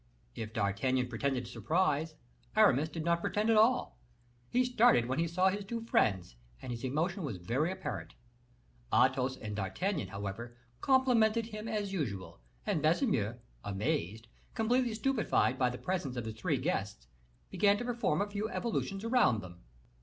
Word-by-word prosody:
If 110 Hz, -1 st, -6 dB
D'Artagnan 110 Hz, +5 st, 0 dB
pretended 125 Hz, +1 st, -1 dB
surprise, 155 Hz, -, 0 dB, 0.4 s
Aramis 150 Hz, +5 st, +4 dB
did 160 Hz, 0 st, -5 dB
not 170 Hz, 0 st, +2 dB
pretend 215 Hz, +5 st, +1 dB
at -, -, +4 dB
all; 215 Hz, -, +3 dB, 0.5 s
he 250 Hz, +1 st, +2 dB
started 240 Hz, -, +4 dB
when 130 Hz, +4 st, -2 dB
he 170 Hz, -, +1 dB
saw 185 Hz, +3 st, +3 dB
his 200 Hz, +2 st, -3 dB
two 230 Hz, +4 st, -4 dB
friends, 95 Hz, -, +1 dB, 0.2 s
and 130 Hz, -, -7 dB
his 120 Hz, +1 st, -5 dB
emotion 165 Hz, +9 st, -1 dB
was 135 Hz, -, -4 dB
very 125 Hz, -, -1 dB
apparent. 95 Hz, -, -6 dB, 0.8 s
Athos 130 Hz, 0 st, +3 dB
and 105 Hz, -2 st, -6 dB
D'Artagnan, 145 Hz, -, -2 dB
however, 105 Hz, +4 st, -6 dB, 0.2 s
complimented 235 Hz, -4 st, +3 dB
him 215 Hz, -1 st, -7 dB
as 210 Hz, -3 st, -2 dB
usual, 105 Hz, -, -4 dB, 0.3 s
and 155 Hz, -, 0 dB
Baisemeaux, 155 Hz, -, +1 dB, 0.3 s
amazed, 110 Hz, -, -2 dB, 0.3 s
completely 240 Hz, 0 st, +1 dB
stupefied 220 Hz, -, +1 dB
by 125 Hz, -1 st, +3 dB
the 125 Hz, -, -5 dB
presence 175 Hz, -8 st, -3 dB
of 120 Hz, -2 st, -3 dB
his 110 Hz, -, -4 dB
three 145 Hz, +6 st, -1 dB
guests, 105 Hz, -, -2 dB, 0.5 s
began 200 Hz, +2 st, +3 dB
to 245 Hz, -, -4 dB
perform 235 Hz, -8 st, 0 dB
a -, -, -4 dB
few 210 Hz, +2 st, -2 dB
evolutions 200 Hz, -4 st, -2 dB
around 230 Hz, -, +3 dB
them. 90 Hz, -2 st, -11 dB
155 Hz, 155 wpm, -32 LUFS, -, 0.8 s, Aramis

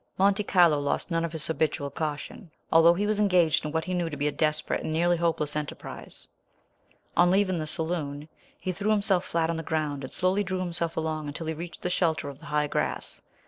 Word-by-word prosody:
Monte 200 Hz, +2 st, +3 dB
Carlo 170 Hz, -7 st, +5 dB
lost 145 Hz, +5 st, -1 dB
none 165 Hz, 0 st, +1 dB
of 170 Hz, -, -2 dB
his 160 Hz, -2 st, -5 dB
habitual 150 Hz, -3 st, -1 dB
caution, 155 Hz, +4 st, -5 dB, 0.2 s
although 165 Hz, +1 st, +7 dB
he 200 Hz, +3 st, 0 dB
was 210 Hz, 0 st, +1 dB
engaged 180 Hz, -6 st, +3 dB
in 150 Hz, -, -3 dB
what 160 Hz, +1 st, -1 dB
he 185 Hz, -, -3 dB
knew 175 Hz, -2 st, 0 dB
to 150 Hz, -, -6 dB
be 145 Hz, +1 st, 0 dB
a -, -, +1 dB
desperate 155 Hz, +1 st, 0 dB
and -, -, -3 dB
nearly 175 Hz, +2 st, +3 dB
hopeless 165 Hz, -3 st, 0 dB
enterprise. 150 Hz, -1 st, -6 dB, 0.9 s
On 175 Hz, 0 st, +5 dB
leaving 190 Hz, -2 st, +2 dB
the 155 Hz, -, -3 dB
saloon 155 Hz, -2 st, -2 dB, 0.3 s
he 185 Hz, -, -2 dB
threw 200 Hz, +4 st, -2 dB
himself 200 Hz, -4 st, +3 dB
flat 165 Hz, 0 st, 0 dB
on 165 Hz, -, -3 dB
the -, -, -2 dB
ground, 150 Hz, -3 st, -2 dB
and 130 Hz, -, -6 dB
slowly 185 Hz, +3 st, +1 dB
drew 185 Hz, -1 st, -2 dB
himself 170 Hz, -2 st, -2 dB
along 155 Hz, -1 st, -2 dB
until 145 Hz, +3 st, -5 dB
he 160 Hz, -, -2 dB
reached 170 Hz, +2 st, -8 dB
the 180 Hz, -, 0 dB
shelter 160 Hz, -5 st, +1 dB
of 140 Hz, -1 st, -10 dB
the 165 Hz, -, -12 dB
high 150 Hz, 0 st, +1 dB
grass. 145 Hz, -, -2 dB
165 Hz, 220 wpm, -27 LUFS, 150-180 Hz, 0.9 s, although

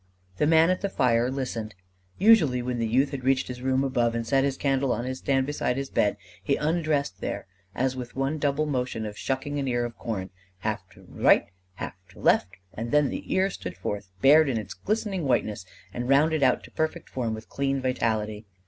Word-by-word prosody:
The 150 Hz, -, +2 dB
man 160 Hz, +2 st, +5 dB
at 185 Hz, -, -1 dB
the 200 Hz, -, -1 dB
fire 120 Hz, -7 st, +2 dB
listened. 120 Hz, -6 st, -4 dB, 0.4 s
Usually 185 Hz, -, +5 dB
when 125 Hz, -1 st, -2 dB
the 115 Hz, -, 0 dB
youth 130 Hz, +5 st, +2 dB
had 135 Hz, -3 st, -5 dB
reached 130 Hz, 0 st, +2 dB
his 125 Hz, 0 st, -6 dB
room 130 Hz, +1 st, +1 dB
above 120 Hz, -3 st, +1 dB
and 115 Hz, 0 st, -2 dB
set 135 Hz, +3 st, +2 dB
his 135 Hz, -1 st, 0 dB
candle 135 Hz, -2 st, +1 dB
on 120 Hz, +1 st, -1 dB
his 130 Hz, 0 st, -4 dB
stand 135 Hz, -1 st, +1 dB
beside 140 Hz, -3 st, -1 dB
his 135 Hz, 0 st, -4 dB
bed, 105 Hz, 0 st, +2 dB, 0.2 s
he 140 Hz, -, +1 dB
undressed 150 Hz, -, 0 dB
there -, -, -3 dB, 0.3 s
as 130 Hz, +1 st, 0 dB
with 125 Hz, -1 st, -7 dB
one 135 Hz, +3 st, -1 dB
double 145 Hz, +1 st, +1 dB
motion 125 Hz, -6 st, -2 dB
of 105 Hz, -1 st, -6 dB
shucking 135 Hz, +5 st, -2 dB
an 135 Hz, -, -2 dB
ear 120 Hz, -1 st, 0 dB
of 120 Hz, -1 st, -6 dB
corn: 100 Hz, -5 st, -4 dB, 0.3 s
half -, -, -3 dB
to -, -, -17 dB
right -, -, +4 dB
and -, -, -27 dB, 0.2 s
half -, -, -5 dB, 0.2 s
to -, -, -16 dB
left; -, -, +4 dB, 0.3 s
and 115 Hz, +2 st, -4 dB
then 150 Hz, 0 st, +3 dB
the -, -, -6 dB
ear 190 Hz, +1 st, +2 dB
stood 90 Hz, -, -7 dB
forth 100 Hz, +1 st, -4 dB
bared 150 Hz, +2 st, +7 dB
in 120 Hz, -, 0 dB
its 105 Hz, -3 st, -5 dB
glistening 205 Hz, -5 st, -2 dB
whiteness 105 Hz, -7 st, 0 dB, 0.3 s
and 120 Hz, +1 st, -4 dB
rounded 155 Hz, +3 st, +4 dB
out 130 Hz, -2 st, +3 dB
to -, -, -13 dB
perfect 160 Hz, 0 st, -2 dB
form 115 Hz, -4 st, -2 dB
with 110 Hz, -, -10 dB
clean 135 Hz, 0 st, -1 dB
vitality. 110 Hz, -4 st, -1 dB
130 Hz, 210 wpm, -26 LUFS, 115-145 Hz, 0.4 s, bared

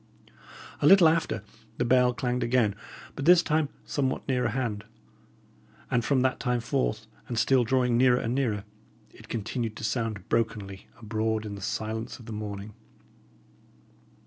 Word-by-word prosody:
A -, -, +4 dB
little 190 Hz, -2 st, +8 dB
after, 160 Hz, -9 st, 0 dB, 0.3 s
the 120 Hz, -, 0 dB
bell 125 Hz, 0 st, +4 dB
clanged 125 Hz, -1 st, -2 dB
again, 120 Hz, -3 st, +2 dB, 0.4 s
but 135 Hz, -, -4 dB
this 175 Hz, +1 st, +7 dB
time 155 Hz, -2 st, +1 dB, 0.2 s
somewhat 135 Hz, -2 st, -2 dB
nearer 125 Hz, -3 st, +1 dB
hand; 115 Hz, -4 st, -2 dB, 1.1 s
and 120 Hz, -2 st, +2 dB
from 135 Hz, +1 st, +2 dB
that 130 Hz, 0 st, +1 dB
time 125 Hz, -1 st, 0 dB
forth, 65 Hz, -, -1 dB, 0.2 s
and 120 Hz, -, -4 dB
still 125 Hz, +3 st, +4 dB
drawing 125 Hz, 0 st, +2 dB
nearer 125 Hz, -1 st, +5 dB
and 115 Hz, -, -2 dB
nearer, 115 Hz, -7 st, 0 dB, 0.5 s
it -, -, -16 dB
continued 115 Hz, 0 st, -3 dB
to -, -, -9 dB
sound 110 Hz, -2 st, -2 dB
brokenly 105 Hz, -4 st, -2 dB
abroad 110 Hz, -1 st, -2 dB
in 105 Hz, -, -5 dB
the 100 Hz, -, -8 dB
silence 110 Hz, +3 st, -3 dB
of 120 Hz, -, -14 dB
the 115 Hz, -, -7 dB
morning. 105 Hz, 0 st, -6 dB
120 Hz, 150 wpm, -27 LUFS, 110-130 Hz, 1.1 s, little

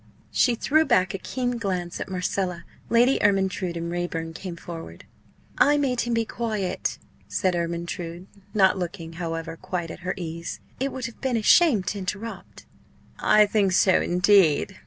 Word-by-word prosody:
She 245 Hz, -2 st, +3 dB
threw 310 Hz, +7 st, +3 dB
back 185 Hz, -, +2 dB
a 195 Hz, -, -4 dB
keen 245 Hz, +1 st, -2 dB
glance 180 Hz, -5 st, -3 dB
at -, -, -5 dB
Marcella. 180 Hz, -1 st, -2 dB, 0.2 s
Lady 240 Hz, +3 st, +4 dB
Ermyntrude 190 Hz, -3 st, +1 dB
and 170 Hz, 0 st, -4 dB
Raeburn 165 Hz, -2 st, -3 dB
came 180 Hz, 0 st, -6 dB
forward. 165 Hz, -1 st, -9 dB, 0.5 s
"I 290 Hz, +1 st, +5 dB
made 260 Hz, -4 st, +1 dB
him 240 Hz, 0 st, -1 dB
be 230 Hz, 0 st, +1 dB
quiet," 215 Hz, -6 st, -2 dB, 0.3 s
said 185 Hz, -1 st, 0 dB
Ermyntrude, 170 Hz, +1 st, -4 dB, 0.3 s
not 190 Hz, -2 st, +3 dB
looking, 170 Hz, -2 st, -5 dB
however, 165 Hz, -1 st, -4 dB
quite 175 Hz, -1 st, -4 dB
at -, -, -9 dB
her 180 Hz, +1 st, -3 dB
ease; 170 Hz, -1 st, -5 dB, 0.2 s
"it 270 Hz, +1 st, -1 dB
would 260 Hz, -2 st, -5 dB
have 235 Hz, -, -8 dB
been 260 Hz, -3 st, 0 dB
a 220 Hz, -, -2 dB
shame 270 Hz, -, +5 dB
to 200 Hz, +2 st, -3 dB
interrupt." 205 Hz, +4 st, -6 dB, 0.5 s
"I 215 Hz, 0 st, +5 dB
think 205 Hz, -2 st, +1 dB
so, 185 Hz, 0 st, +4 dB
indeed!" 185 Hz, -1 st, +3 dB
190 Hz, 160 wpm, -25 LUFS, 175-225 Hz, 0.5 s, I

